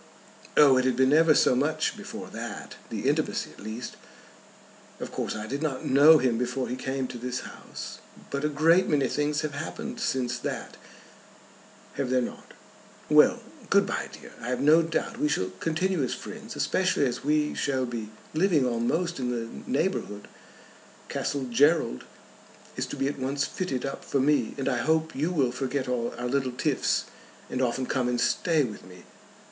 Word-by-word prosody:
"Oh, 140 -3 +7
it 130 - +2
had 130 -2 +2
been 130 +2 +4
ever 160 0 +6
so - - +4
much 155 +4 0
before - - -8
that, - - -6 0.2
the - - -3
intimacy - - 0
at - - -17
least. 110 +4 -6 1.0
Of - - -6
course - - -3
I 110 0 -4
did 140 +6 -4
not 145 -5 -2
know 145 +4 +7
him 125 -5 +1
before 125 +1 -1
he 125 - -3
came 135 +1 -2
to 120 - -7
this 125 +1 -3
house. - - -8 0.3
But 140 +1 -2
a 150 - +2
great 165 +5 +4
many 140 -3 +3
things 150 +2 0
have 150 -1 -3
happened 230 +11 -5
since 125 - -1
that; - - -5 1.2
have 135 -2 -1
there 130 0 +3
not? - - -8 0.6
Well, - - +6 0.3
good - - +5
bye, - - -3
dear. - - -12
I - - -6
have 125 0 -1
no 150 +4 +6
doubt 165 0 -2
we 150 - +2
shall 95 -10 0
continue 175 +1 0
as 130 - -1
friends, 220 +1 -8
especially 185 -6 +1
as 125 -1 -2
we 150 +1 +2
shall 130 -2 0
be 115 -3 -5 0.2
living 160 -4 +3
almost 125 +8 0
in 125 -1 -1
the 115 -2 -2 0.2
neighbourhood. 135 - -1 0.8
Castle 140 -2 -2
Gerald 130 - +2 0.7
is - - -2
to - - -5
be 135 - 0
at 140 0 -3
once 135 +2 0
fitted 135 -9 -3
up 135 - -5
for 140 - 0
me, 145 +3 +2
and 135 - -2
I 125 -3 +1
hope 160 +4 +1
you 150 +5 0
will 140 -9 +1
forget 130 +1 -2
all 120 -2 -1
our 120 - -4
little 130 0 0
tiffs, 125 - +1 0.5
and 130 - -1
often 130 +1 0
come 125 -1 0
and 120 0 0
stay 160 +4 +2
with 110 -5 -6
me." 90 -1 -13
135 Hz, 180 wpm, -27 LUFS, 125-155 Hz, 1.2 s, Oh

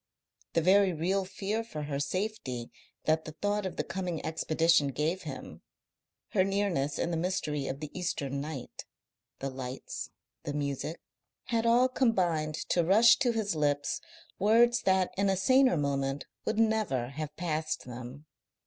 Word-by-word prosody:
The 165 - +3
very 190 +1 +5
real 185 +5 0
fear 200 +4 -2
for 155 -10 -6
her 145 -1 -3
safety 145 - -3 0.3
that 160 0 +2
the 155 - -7
thought 205 +3 -1
of 185 - -7
the - - -1
coming 180 -3 -4
expedition 160 -1 +2
gave 150 +7 -1
him, 145 -5 -8 0.7
her 190 - +3
nearness 190 -8 0
in 170 - -1
the 165 - 0
mystery 160 -5 -1
of 135 +2 -4
the 150 - -5
Eastern 140 -6 -2
night, 140 -4 -6 0.5
the 135 0 -4
lights, 130 0 -6 0.3
the 145 - -4
music, 145 +2 -3 0.5
had 230 -1 +1
all 240 +2 +5
combined 180 - +1
to 175 - +3
rush 210 +7 +6
to 255 -3 +3
his 220 -3 -1
lips 145 -1 0 0.4
words 235 +4 +5
that 190 -1 +3
in 200 0 +3
a 190 - +2
saner 260 0 +4
moment 140 -1 -1 0.2
would - - -1
never 215 - +1
have 150 +2 -6
passed 160 -2 -2
them. 125 +4 -8
165 Hz, 155 wpm, -30 LUFS, 145-200 Hz, 0.7 s, rush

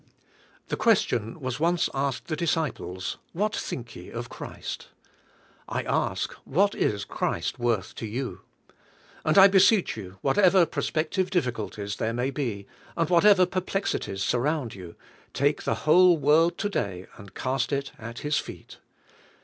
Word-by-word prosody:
The - - -2
question 120 - +1
was 130 -1 -4
once 170 +1 +2
asked 135 -1 -2
the 155 - -2
disciples, 150 - -2 0.2
''What 210 +4 0
think 115 -2 -5
ye - - -10
of - - -6
Christ?" - - -7 0.8
I - - -2
ask, - - -1
"What 200 +8 +2
is 100 -1 -1
Christ - - -2
worth 115 -5 0
to 115 - -4
you?" 125 +4 -4 0.8
And 155 - +2
I 195 0 +10
beseech 195 +1 +4
you, 95 -3 -9
whatever 185 +4 +4
prospective 170 +4 -1
difficul 125 - -1
ties 100 -1 -5
there 115 +1 -1
ma}^ 125 +3 -1
be, 115 -9 -3 0.3
and 165 0 0
whatever 185 +1 +6
perplexities 185 - -2
sur 125 - +1
round 145 -2 -1
you, 90 -3 -10 0.4
take 145 +3 +1
the - - +1
whole 175 +2 +6
world 155 +4 +3
to 205 - -1
day 95 - -3
and 100 -3 -13
cast 130 0 -1
it 140 -1 -2
at 115 +1 -8
His 150 0 +2
feet. - - -10
140 Hz, 150 wpm, -26 LUFS, 115-175 Hz, 0.8 s, I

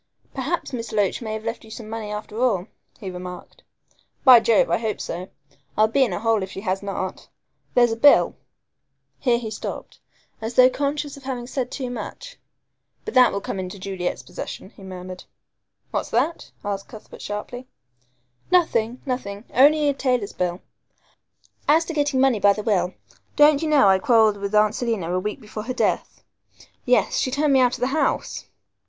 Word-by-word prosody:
"Perhaps 280 +3 -3
Miss 230 -2 -4
Loach 205 0 0
may 220 -2 -4
have 220 0 -5
left 230 +1 -4
you 220 - -14
some 220 0 -9
money 220 -1 -5
after 210 +2 -5
all," 210 -8 +2 0.3
he 195 -5 -6
remarked. 180 0 -9 0.6
"By 255 -3 +9
Jove, 225 -1 +3
I - - +2
hope 220 -3 -2
so. 180 +3 -5 0.5
I'll 215 +1 +5
be 265 +5 +3
in 240 - 0
a 175 - -2
hole 225 -1 +2
if 190 - -4
she 190 - -7
has 190 -2 -1
not. 195 -2 -5 0.5
There's 240 -1 +5
a - - 0
bill 280 +5 +5 0.4
" - - -54 0.3
here 245 -3 +2
he 225 -2 -5
stopped, 215 - -7 0.4
as 225 +2 -4
though 255 0 +7
conscious 285 +1 -2
of 280 - -14
having 250 -3 -4
said 250 0 -3
too 255 -2 -4
much. - - -7 0.7
"But - - -5
that 255 -1 +6
will 200 - -3
come 195 - -4
into 185 +1 -5
Juliet's 185 -2 -4
possession," 190 - -8
he - - -17
murmured. 185 -1 -8 0.7
"What's - - -2
that?" 275 +9 -1 0.2
asked 200 -1 -3
Cuthbert 215 - -12
sharply. 245 +5 -6 0.8
"Nothing 250 -10 +2
nothing 210 -6 -4
only 295 +4 +5
a 285 - +3
tailor's 250 -6 -1
bill. 180 0 -2 1.1
As 320 +3 +4
to 330 - -5
getting 290 -3 +1
money 260 -4 +3
by 200 0 +5
the 210 - -5
will, 185 -4 0 0.4
don't 295 -1 +6
you 320 - -1
know 285 -8 +5
I 190 -1 +5
quarrelled 220 -1 +4
with 200 +1 -3
Aunt 210 0 +4
Selina 215 -9 -2
a 185 - +1
week 210 +3 -4
before 215 0 -8
her 255 - -3
death. - - -1 0.6
Yes, - - +2
she 260 - 0
turned 285 +2 +1
me 265 - +5
out 250 -1 +3
of 250 - -11
the - - +3
house." 315 - -1
225 Hz, 185 wpm, -23 LUFS, 200-260 Hz, 1.1 s, By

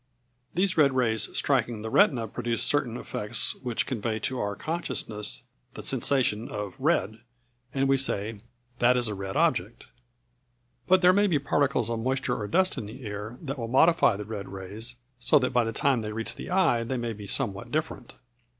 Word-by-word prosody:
These 185 +1 +1
red 140 -4 +5
rays 110 -4 +2
striking 120 -5 +1
the 110 - -5
retina 135 - +4
produce 115 +2 -2
certain 125 -5 +1
effects 105 -3 -2
which 125 -3 -2
convey 115 -3 -2
to 130 -1 -2
our 100 0 -2
consciousness 105 - -3 0.3
the - - -7
sensation 120 -5 +1
of 105 -2 -5
red, 115 - +1 0.5
and 135 -1 +1
we 135 0 +4
say 110 -5 -1 0.4
"That 125 +1 +4
is 120 -1 +2
a 105 - -2
red 95 -1 -5
object." - - 0 1.0
But 185 0 +4
there 180 +1 +7
may 205 +2 +4
be 170 -6 +2
particles 140 -4 +1
of 115 - -2
moisture 130 +1 -1
or 105 - -4
dust 185 - +2
in 105 - -6
the 120 +4 -10
air 105 +3 -6
that 135 -2 -4
will 115 - -3
modify 135 - +4
the 105 +1 -6
red 105 -2 -6
rays 100 +6 -7 0.2
so 120 - +4
that 125 -2 0
by 125 -1 +4
the 115 - -2
time 130 +1 +1
they 105 0 -4
reach 115 +1 -1
the - - -8
eye 175 -11 +3
they 130 +3 -3
may 120 -1 -3
be 105 -1 -9
somewhat 100 0 0
different. 155 +1 -3
120 Hz, 185 wpm, -27 LUFS, 105-140 Hz, 1.0 s, there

